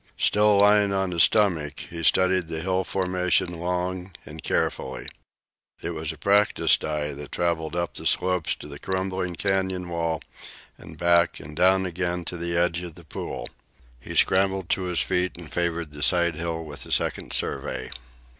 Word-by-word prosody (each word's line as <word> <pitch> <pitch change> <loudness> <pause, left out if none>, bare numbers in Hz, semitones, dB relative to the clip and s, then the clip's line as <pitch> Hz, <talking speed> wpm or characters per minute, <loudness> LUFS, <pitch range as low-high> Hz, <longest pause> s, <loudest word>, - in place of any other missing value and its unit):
Still 105 -1 +4
lying 105 0 +5
on 95 -1 0
his 85 -1 +2
stomach, 80 -9 +3
he 85 -1 -7
studied 95 +1 +3
the 80 -1 -4
hill 95 +1 0
formation 90 -2 0
long 90 +1 -2
and 75 +2 -9
carefully. 65 - -1 0.8
It 85 - -2
was 80 -2 -3
a 80 - -10
practised 100 +5 +3
eye 75 -1 -2
that 70 0 -9
traveled 85 -2 -1
up 85 0 -1
the - - -2
slope 90 -2 +2
to - - -2
the 70 -1 -9
crumbling 95 -1 -2
canyon 95 -1 -1
wall 85 -2 -2 0.5
and 80 - -12
back 85 0 +3
and 75 +1 -10
down 95 +2 +4
again 90 0 -2
to 90 - -4
the 85 0 -1
edge 85 0 +2
of 85 -3 -8
the 85 - -14
pool. - - -5 0.5
He - - -8
scrambled 95 -1 +2
to 95 - +1
his 90 -2 +1
feet 90 -1 0
and 85 -3 -11
favored 85 -2 -1
the 75 0 -9
side 85 +1 +3
hill 80 0 -4
with 75 -3 -6
a - - -8
second - - -1
survey. 65 - -2
85 Hz, 175 wpm, -25 LUFS, 80-95 Hz, 0.8 s, lying